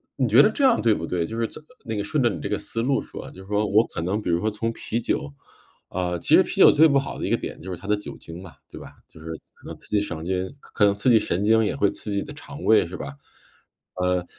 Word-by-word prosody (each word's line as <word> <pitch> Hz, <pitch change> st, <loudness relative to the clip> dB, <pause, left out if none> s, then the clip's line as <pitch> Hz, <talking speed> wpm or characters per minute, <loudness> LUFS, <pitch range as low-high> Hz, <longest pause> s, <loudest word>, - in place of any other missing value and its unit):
你 130 Hz, -3 st, +1 dB
觉 115 Hz, +5 st, +7 dB
得 210 Hz, -, +5 dB
这 275 Hz, -, -2 dB
样 255 Hz, -3 st, +4 dB
对 115 Hz, -, +3 dB
不 85 Hz, -5 st, -3 dB
对？ 85 Hz, 0 st, -1 dB
就 115 Hz, +1 st, -5 dB
是， 115 Hz, -, 0 dB, 0.4 s
那 110 Hz, -, -3 dB
个 100 Hz, -, -2 dB
顺 135 Hz, +6 st, 0 dB
着 120 Hz, -, +4 dB
你 100 Hz, -, -5 dB
这 100 Hz, -, -4 dB
个 105 Hz, -, 0 dB
思 115 Hz, -, -3 dB
路 135 Hz, +2 st, +1 dB
说， -, -, -9 dB
就 95 Hz, +1 st, -13 dB
说 105 Hz, +1 st, 0 dB
我 105 Hz, +3 st, +4 dB
可 85 Hz, -, -5 dB
能 95 Hz, +5 st, -1 dB
比 -, -, -7 dB
如 85 Hz, 0 st, +2 dB
说 110 Hz, -, +1 dB
从 115 Hz, +2 st, -3 dB
啤 115 Hz, -, -3 dB
酒 145 Hz, +5 st, -2 dB, 0.6 s
呃， 90 Hz, -1 st, -2 dB
其 -, -, +4 dB
实 -, -, +7 dB
啤 -, -, -1 dB
酒 -, -, +9 dB
最 160 Hz, +2 st, +6 dB
不 140 Hz, -2 st, +3 dB
好 135 Hz, -, -3 dB
的 -, -, -2 dB
一 -, -, -2 dB
个 -, -, +2 dB
点 -, -, -7 dB
就 95 Hz, -, -8 dB
是 90 Hz, -, -5 dB
它 100 Hz, -, -11 dB
的 105 Hz, -, +3 dB
酒 105 Hz, -, -9 dB
精 85 Hz, +2 st, -10 dB
嘛， 90 Hz, -3 st, -11 dB, 0.2 s
对 -, -, -9 dB
吧？ -, -, -11 dB
就 80 Hz, -, -17 dB
是 80 Hz, -, -10 dB, 0.3 s
可 -, -, -16 dB
能 -, -, -8 dB
刺 -, -, -14 dB
激 105 Hz, -1 st, +2 dB
神 80 Hz, -6 st, -5 dB
经 95 Hz, +1 st, -1 dB
可 105 Hz, -, -2 dB
能 100 Hz, 0 st, +3 dB
刺 120 Hz, +5 st, +2 dB
激 110 Hz, -, +6 dB
神 95 Hz, -1 st, -1 dB
经 110 Hz, +1 st, +4 dB
也 105 Hz, -, -1 dB
会 100 Hz, -, +2 dB
刺 105 Hz, -, -5 dB
激 100 Hz, -, -1 dB
你 -, -, -3 dB
的 150 Hz, -, -9 dB
肠 145 Hz, +1 st, -10 dB
胃 110 Hz, -6 st, +4 dB
是 90 Hz, +1 st, -7 dB
吧？ 70 Hz, 0 st, -7 dB, 0.8 s
呃， 90 Hz, -1 st, 0 dB
105 Hz, 320 characters per minute, -24 LUFS, 90-115 Hz, 0.8 s, 酒